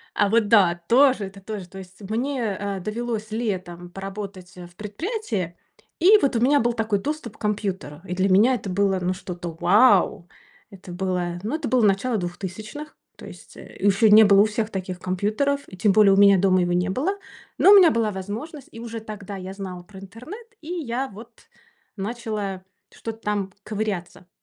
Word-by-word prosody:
А 205 - +2
вот 225 0 +2
да, 190 -6 +4
тоже 255 -3 +4
это 195 +1 -11
тоже, 195 -2 -7
то 195 - -13
есть. 190 +1 -13
Мне, 235 -2 -1
а, 200 -1 -3
довелось 215 +2 -4
летом 185 -6 -4
поработать, 195 -1 -8
э, 175 -1 -9
в 175 - -22
предприятии, 210 - -4 0.4
и 395 +6 +7
вот 270 -3 +1
у - - +2
меня 280 +5 +4
был 240 -1 +1
такой 220 -3 -1
доступ 285 -4 -5
к - - -36
компьютеру. 195 -8 -3
И 180 - -4
для 190 +2 +1
меня 215 +7 +5
это 210 - -6
было, 195 0 +1
ну, 180 +1 -1
что-то 175 -1 -7
вау, 200 -3 +4 0.4
это 190 -3 -12
было, 180 -1 -2
ну, 225 +8 -2
это 315 -3 -3
было 255 -2 +2
начало 210 +4 +1
2000. 205 - -7 0.2
То - - -12
есть, - - -14
э, - - -12
ещё 200 +2 +3
не 215 +1 +9
было 200 -1 +6
у - - +5
всех 215 0 -2
таких 185 -3 -5
компьютеров. 215 +11 -1
И 185 - -12
тем 200 +2 +3
более 205 -1 +6
у - - +2
меня 200 -1 +7
дома 185 -1 +3
его 175 0 0
не 180 +2 0
было. 310 - -1 0.4
Но 390 - +6
у - - +10
меня 365 -4 +7
была 225 -4 0
возможность. 220 - -7
И 230 - -11
уже 230 -1 -6
тогда 210 -2 -8
я 190 0 -7
знала 185 -2 -7
про 190 +2 -13
интернет. 250 - -11
И 310 - -13
я 265 -5 -3
вот 220 +4 -12 0.7
начала 210 -3 -4 0.3
что-то 225 -1 -7
там 205 -3 -2
ковыряться. 200 -5 -4
205 Hz, 190 wpm, -23 LUFS, 190-230 Hz, 0.7 s, у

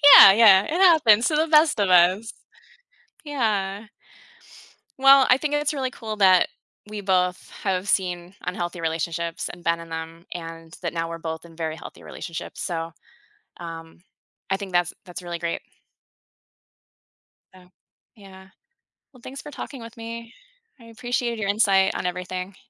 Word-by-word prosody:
Yeah, 195 - +11
yeah, 205 -3 +7
it - - -6
happens 315 - +5
to 305 - 0
the 320 +1 +1
best 305 -5 +4
of 200 -2 +1
us. 185 +5 +4 0.9
Yeah. 215 -8 -2 1.1
Well, 270 0 +7
I 250 - +6
think 295 +1 -3
it's 295 0 0
really 260 -2 -3
cool 220 -3 -6
that 185 -3 +5 0.4
we 210 -1 -7
both 180 -2 0
have 190 0 -1
seen 180 -1 -1
unhealthy 175 -1 -4
relationships 165 +1 -3
and 175 -1 -11
been 170 0 +1
in 165 0 -11
them 165 +1 -7
and 165 -1 -9
that 170 -1 -4
now 165 0 -3
we're 165 - -6
both 160 0 -6
in 165 -1 -15
very 160 -1 -4
healthy - - -12
relationships, 165 -2 -8
so, 165 -1 -4 0.7
um, 165 -1 -9 0.5
I 195 - +1
think 195 -2 -8
that's 175 -1 +1
that's 180 0 -9
really 175 -1 -6
great. 170 0 -3 1.9
Oh, 180 -1 -18 0.5
yeah. 190 -2 -15 0.6
Well, 250 - -18
thanks 270 +2 -8
for 295 - -10
talking 270 -4 -8
with 230 0 -12
me. 230 0 -8 0.5
I 230 - -16
appreciate 235 0 -3
your 200 -2 -2
insight 195 -2 +3
on - - -4
everything. 180 +1 -5
190 Hz, 155 wpm, -23 LUFS, 170-230 Hz, 1.9 s, Yeah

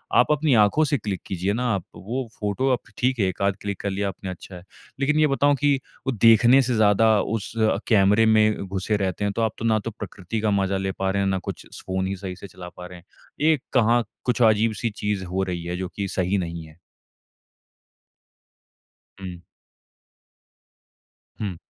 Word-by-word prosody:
आप 125 - +5
अपनी 150 -2 +2
आँखों 150 +10 +2
से 145 -1 +1
क्लिक 100 -4 -4
कीजिए 95 +2 -1
ना 125 +2 -2
आप 95 - -4
वो 120 +5 -4
फ़ोटो 105 +6 0
आप 120 - 0 0.2
ठीक 125 -1 0
है 100 - +3
1 95 - -4
आध 100 -1 +2
क्लिक 100 -2 -4
कर 100 - -2
लिया 100 +1 -1
आपने 95 0 -7
अच्छा 90 +1 -10
है, 90 - -11 0.4
लेकिन 150 +2 +2
ये 155 - +5
बताऊँ 145 +1 +2
कि 145 -1 +4 0.3
वो 135 - +1
देखने 115 +4 +6
से 125 -1 0
ज़्यादा 110 0 +4
उस 110 -1 -3 0.3
कैमरे 105 0 +4
में 110 -2 +3
घुसे 95 +2 -1
रहते 95 0 -2
हैं 100 - -1
तो 115 - -1
आप 110 -2 +1
तो 115 - -3
ना 110 -1 +3
तो 115 +2 -5
प्रकृति 105 +1 -6
का 110 -1 +1
मज़ा 100 -1 +1
ले 95 0 -2
पा 95 0 +1
रहे 100 0 0
हैं 95 - +1
ना 95 - +1
कुछ - - -7 0.2
फ़ोन 95 0 -1
ही 95 - -2
सही 95 -1 -6
से 100 - -10
चला 90 0 -10
पा 90 - -8
रहे 90 - -11
हैं। 85 - -23 0.5
एक 145 -4 0
कहाँ 120 -1 +3 0.2
कुछ 125 0 0
अजीब-सी 110 0 +3
चीज़ 105 -2 -2
हो 95 +2 -2
रही 90 -2 -4
है 90 +1 -3
जो 95 -1 -3
कि 100 -1 -2
सही 95 +2 0
नहीं 85 -2 -4
है। 80 +1 -18 2.4
हुँ। 90 -2 -8 2.0
हुँ। 95 -5 -3
105 Hz, 200 wpm, -24 LUFS, 95-115 Hz, 2.4 s, देखने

